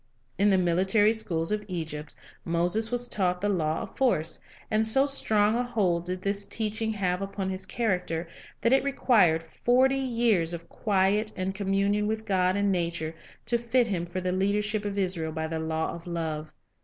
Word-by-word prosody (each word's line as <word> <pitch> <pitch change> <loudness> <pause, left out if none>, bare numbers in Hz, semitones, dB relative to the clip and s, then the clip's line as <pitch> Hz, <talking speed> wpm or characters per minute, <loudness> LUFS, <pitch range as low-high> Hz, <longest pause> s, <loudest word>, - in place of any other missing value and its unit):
In 205 +1 +4
the 195 - +4
military 190 +5 +3
schools 170 -7 0
of 210 0 -1
Egypt, 160 -5 -5 0.3
Moses 175 +7 +1
was 245 0 0
taught 180 -5 0
the 205 +2 0
law 160 -5 0
of - - -11
force, 165 - +1 0.3
and 220 +1 +2
so 270 +5 +5
strong 215 -7 +3
a - - +1
hold 190 -8 0
did 185 +1 -4
this 200 0 -1
teaching 220 0 -2
have 185 -3 -1
upon 195 -1 -3
his 190 0 -5
character 180 -8 -1 0.3
that 235 - +3
it 270 - +4
required 215 -12 +3
forty 250 +10 +2
years 230 -10 +1
of 170 0 -11
quiet 205 +1 +1
and 185 +1 -2
communion 200 +1 0
with 220 0 -3
God 185 -3 +2
and 200 0 +1
nature 170 -3 -2 0.3
to 235 - +1
fit 240 +1 +2
him 180 -6 -2
for 180 +2 -4
the 180 0 -2
leadership 205 +3 0
of 205 -1 -3
Israel 180 -5 0
by 160 0 -3
the 160 0 -3
law 160 0 -2
of 170 +1 -10
love. 160 -3 -4
195 Hz, 180 wpm, -27 LUFS, 170-220 Hz, 0.3 s, so